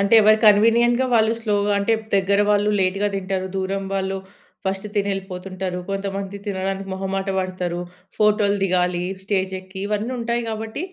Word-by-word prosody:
అంటే 200 +3 +3
ఎవరి 215 +1 +6
కన్వీనియంట్‌గా 235 +4 +5
వాళ్ళు 220 0 +4
స్లోగా 205 -2 +1
అంటే 200 +3 +1 0.2
దగ్గర 200 +1 +2
వాళ్ళు 205 0 +3
లేట్‌గా 195 +2 +1
తింటారు, 190 -1 -2
దూరం 195 +1 -2
వాళ్ళు 195 0 -1 0.5
ఫస్ట్ 195 +2 -2
తినెళ్ళిపోతుంటారు, 190 -2 -3
కొంతమంది 195 0 -3
తినడానికి 195 0 -3
మొహమాట 195 +1 -3
పడతారు, 180 -2 -2 0.4
ఫోటోలు 210 -1 +3
దిగాలి 180 -1 +1 0.2
స్టేజెక్కి 190 -1 -2
ఇవన్నుంటాయి 235 +3 -1
గాబట్టి 220 +5 -4
195 Hz, 125 wpm, -22 LUFS, 190-210 Hz, 0.5 s, ఎవరి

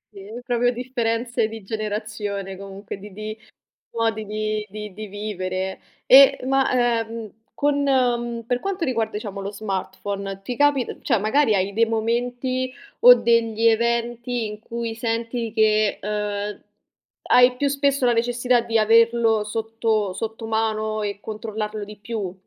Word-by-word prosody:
Sì, 195 0 -10 0.2
proprio 245 0 +2
differenze 235 -2 -1
di 220 -1 -9
generazione, 210 -2 -4
comunque 195 +1 -8
di 205 +1 -11
di 215 +2 -6 0.6
modi 225 -1 -1
di 215 0 -2
di 210 -2 -7
di 215 +1 -7
vivere. 190 -2 -4 0.3
E 270 +1 +8
ma, 270 0 +2 0.3
ehm, 225 -1 -6 0.2
con, 285 0 +1
mhmm, 240 -3 +1
per 245 0 0
quanto 390 -3 -2
riguarda 225 -4 0
diciamo 205 -2 -5
lo 195 0 -4
smartphone 195 -1 -4
ti 245 +5 -4
capit 290 -3 +1
cioè 230 -5 +2
magari 220 +2 +2
hai 195 +1 0
dei 230 +3 +3
momenti 245 +3 -1 0.3
o - - +10
degli 230 - +2
eventi 235 +1 +1
in 210 0 -7
cui 230 0 -4
senti 230 0 -2
che, 215 -1 +2
ehm, 210 0 -3 0.7
hai 250 0 +6
più 285 - 0
spesso 280 -2 +1
la 240 - +4
necessità 240 +1 +2
di 230 -1 0
averlo 225 0 +4
sotto 220 -2 -1
sottomano 220 0 -2
e 205 -1 -3
controllarlo 215 -1 -5
di 210 +1 -11
più? 205 -3 -4
225 Hz, 140 wpm, -23 LUFS, 210-240 Hz, 0.7 s, o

